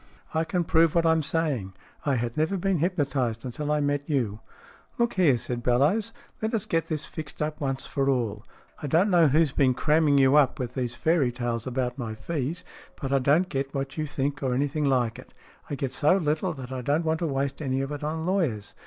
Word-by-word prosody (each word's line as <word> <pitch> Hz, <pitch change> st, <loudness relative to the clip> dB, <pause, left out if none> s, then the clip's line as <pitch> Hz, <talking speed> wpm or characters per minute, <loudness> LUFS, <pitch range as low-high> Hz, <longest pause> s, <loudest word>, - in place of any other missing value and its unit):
I 160 Hz, +1 st, +1 dB
can 180 Hz, +1 st, 0 dB
prove 165 Hz, -1 st, +3 dB
what 170 Hz, -1 st, +3 dB
I'm 160 Hz, 0 st, +4 dB
say 155 Hz, -3 st, 0 dB
ing. 95 Hz, -1 st, -9 dB, 0.3 s
I 140 Hz, -, +3 dB
had 120 Hz, -1 st, -2 dB
never 160 Hz, +6 st, +1 dB
been 190 Hz, -1 st, 0 dB
hypnotized 140 Hz, -, -1 dB
until 145 Hz, +4 st, -3 dB
I 150 Hz, 0 st, +2 dB
met 145 Hz, 0 st, -1 dB
you." 115 Hz, -8 st, 0 dB, 0.6 s
"Look 235 Hz, 0 st, +1 dB
here," 165 Hz, -9 st, +4 dB
said 120 Hz, +1 st, -4 dB
Bellowes. 150 Hz, -, +2 dB, 0.3 s
"Let 220 Hz, +1 st, 0 dB
us 210 Hz, -, -1 dB
get 165 Hz, -1 st, 0 dB
this 155 Hz, -1 st, -3 dB
fixed 155 Hz, -3 st, -8 dB
up 150 Hz, 0 st, -3 dB
once 135 Hz, -1 st, -2 dB
for 140 Hz, 0 st, 0 dB
all. 115 Hz, -5 st, -1 dB, 0.4 s
I 150 Hz, -, -3 dB
don't 175 Hz, +8 st, +3 dB
know 170 Hz, -3 st, +6 dB
who's 155 Hz, +1 st, +3 dB
been 135 Hz, -3 st, +2 dB
cramming 150 Hz, 0 st, +3 dB
you 135 Hz, +1 st, +5 dB
up 140 Hz, -4 st, +4 dB
with 125 Hz, -1 st, -4 dB
these 125 Hz, -2 st, -3 dB
fairy 155 Hz, -2 st, +2 dB
tales 120 Hz, -1 st, -3 dB
about 125 Hz, 0 st, -2 dB
my 110 Hz, -3 st, -4 dB
fees, 150 Hz, +7 st, -3 dB, 0.3 s
but 135 Hz, -1 st, -2 dB
I 135 Hz, -, +4 dB
don't 150 Hz, +8 st, +3 dB
get 135 Hz, -3 st, -3 dB
what 135 Hz, 0 st, -3 dB
you 155 Hz, -1 st, -2 dB
think, 145 Hz, +1 st, -2 dB
or 130 Hz, -3 st, 0 dB
anything 145 Hz, +3 st, 0 dB
like 125 Hz, -4 st, +1 dB
it. -, -, -14 dB, 0.4 s
I 145 Hz, -, -2 dB
get 135 Hz, -1 st, -3 dB
so 150 Hz, +8 st, +3 dB
little, 160 Hz, +1 st, 0 dB
that 130 Hz, -3 st, -8 dB
I 130 Hz, -1 st, -3 dB
don't 145 Hz, +6 st, 0 dB
want 160 Hz, 0 st, +1 dB
to 170 Hz, -, -1 dB
waste 140 Hz, 0 st, -2 dB
any 135 Hz, -2 st, 0 dB
of 135 Hz, +1 st, -4 dB
it 145 Hz, 0 st, -5 dB
on 160 Hz, +2 st, -2 dB
lawyers. 160 Hz, -, -1 dB
145 Hz, 225 wpm, -26 LUFS, 130-160 Hz, 0.6 s, know